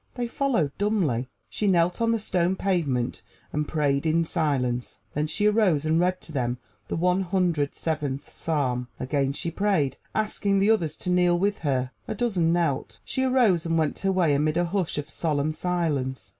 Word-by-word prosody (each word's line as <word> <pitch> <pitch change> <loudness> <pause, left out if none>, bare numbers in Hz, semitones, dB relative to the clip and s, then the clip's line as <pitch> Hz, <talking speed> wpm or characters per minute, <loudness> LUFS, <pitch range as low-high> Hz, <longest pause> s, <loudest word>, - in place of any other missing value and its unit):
They 245 - -2
followed 235 - 0
dumbly. 170 - 0 0.2
She 210 - -2
knelt 175 +1 +2
on 230 0 +3
the 230 - +2
stone 185 -4 0
pavement 150 -11 -1 0.3
and 150 0 -1
prayed 140 -3 +1
in 165 +1 +3
silence. 130 -7 -1 0.2
Then 150 +1 0
she 205 +7 0
arose 205 -9 +3
and 160 +1 +2
read 180 +1 +1
to - - -10
them 125 -4 -1 0.3
the - - -3
One 180 +3 +2
Hundred 175 -6 0
Seventh 150 -4 -3
Psalm. 130 -6 -1
Again 135 +1 0
she 165 +4 -4
prayed, 185 -7 +1 0.2
asking 205 -2 0
the 200 +3 +4
others 165 -8 +1
to 180 - -3
kneel 180 -1 +3
with 200 +3 0
her. 130 -4 -1 0.2
A - - -3
dozen 195 -9 +1
knelt. 165 -6 0
She 260 - -1
arose 245 -10 +3
and 165 0 +1
went 155 -2 0
her 195 - +1
way 175 -6 +3
amid 150 +3 +1
a 175 - +2
hush 180 -2 -1
of 150 - -3
solemn 155 -1 -1
silence. 145 - -2
165 Hz, 185 wpm, -26 LUFS, 145-190 Hz, 0.3 s, the